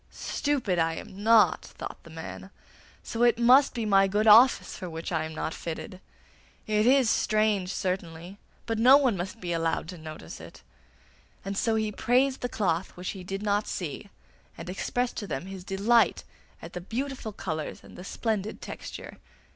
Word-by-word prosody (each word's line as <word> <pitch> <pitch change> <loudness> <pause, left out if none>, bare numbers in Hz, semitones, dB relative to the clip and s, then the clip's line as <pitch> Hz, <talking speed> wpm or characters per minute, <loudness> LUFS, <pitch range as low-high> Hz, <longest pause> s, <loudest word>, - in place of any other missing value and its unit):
'Stupid 265 - -1
I 165 0 +1
am 195 - -9
not!' 225 -1 +5
thought - - -9
the - - -15
man, - - -8 0.5
'so 230 - -4
it 240 -1 +5
must 255 +4 +5
be 230 -2 -2
my 195 -2 +4
good 205 +3 0
office 230 +4 +6
for 185 -3 -6
which 165 +1 -6
I 160 -2 0
am 160 0 -8
not 160 - -3
fitted. 170 +3 -6 0.7
It 215 +1 +2
is 265 -1 +5
strange, 215 -4 +1
certainly, 180 0 -4 0.3
but 225 -1 -2
no 255 +4 +8
one 260 -7 +2
must 185 +5 -5
be 175 -3 -3
allowed 165 -1 -1
to 180 -2 -8
notice 155 0 -9
it.' - - -13 0.8
And 195 0 -3
so 225 +3 +1
he 215 -1 0
praised 255 +5 +1
the 245 - -2
cloth 185 -5 -1
which 180 +1 -4
he 190 -3 -9
did 195 +2 -5
not 205 0 +1
see, 175 +3 -5 0.5
and 180 - -6
expressed 245 +6 -2
to 205 - -4
them 155 -1 -4
his 190 -1 -8
delight 205 +2 +2 0.4
at 165 - -9
the 180 - -5
beautiful 250 +3 -4
colours 160 -6 -5
and - - -14
the 180 - -9
splendid 215 0 -3
texture. - - -8
200 Hz, 180 wpm, -27 LUFS, 180-230 Hz, 0.8 s, no